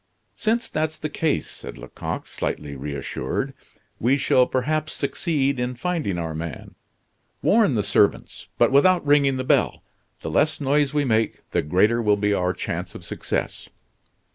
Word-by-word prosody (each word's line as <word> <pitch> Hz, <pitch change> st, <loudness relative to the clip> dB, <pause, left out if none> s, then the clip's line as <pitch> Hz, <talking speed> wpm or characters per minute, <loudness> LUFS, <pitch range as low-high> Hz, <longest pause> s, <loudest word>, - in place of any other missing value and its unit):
"Since 230 Hz, +2 st, -1 dB
that's 155 Hz, 0 st, -1 dB
the 155 Hz, -, -4 dB
case," 155 Hz, -1 st, 0 dB
said -, -, -9 dB
Lecoq, -, -, -6 dB
slightly 75 Hz, -2 st, -4 dB
reassured, 70 Hz, -2 st, -3 dB, 0.5 s
"we 130 Hz, +5 st, +3 dB
shall 130 Hz, -2 st, +3 dB
perhaps 155 Hz, +4 st, -1 dB
succeed 140 Hz, -2 st, 0 dB
in 125 Hz, +1 st, -2 dB
finding 155 Hz, -, -2 dB
our 80 Hz, -2 st, -3 dB
man. 80 Hz, -3 st, -6 dB, 0.7 s
Warn 210 Hz, -, +4 dB
the 105 Hz, -, +1 dB
servants, 100 Hz, 0 st, +1 dB
but -, -, +4 dB
without 175 Hz, +5 st, +4 dB
ringing 140 Hz, -2 st, +4 dB
the 130 Hz, -, -2 dB
bell. -, -, +1 dB, 0.4 s
The -, -, -4 dB
less 155 Hz, +2 st, +2 dB
noise 145 Hz, 0 st, +2 dB
we 145 Hz, -1 st, +1 dB
make, 110 Hz, -2 st, 0 dB
the -, -, +2 dB
greater 105 Hz, +10 st, +2 dB
will 105 Hz, -2 st, +3 dB
be 105 Hz, 0 st, +1 dB
our 90 Hz, -2 st, +1 dB
chance -, -, -4 dB
of -, -, -9 dB
success." -, -, -4 dB
130 Hz, 155 wpm, -23 LUFS, 100-150 Hz, 0.7 s, Warn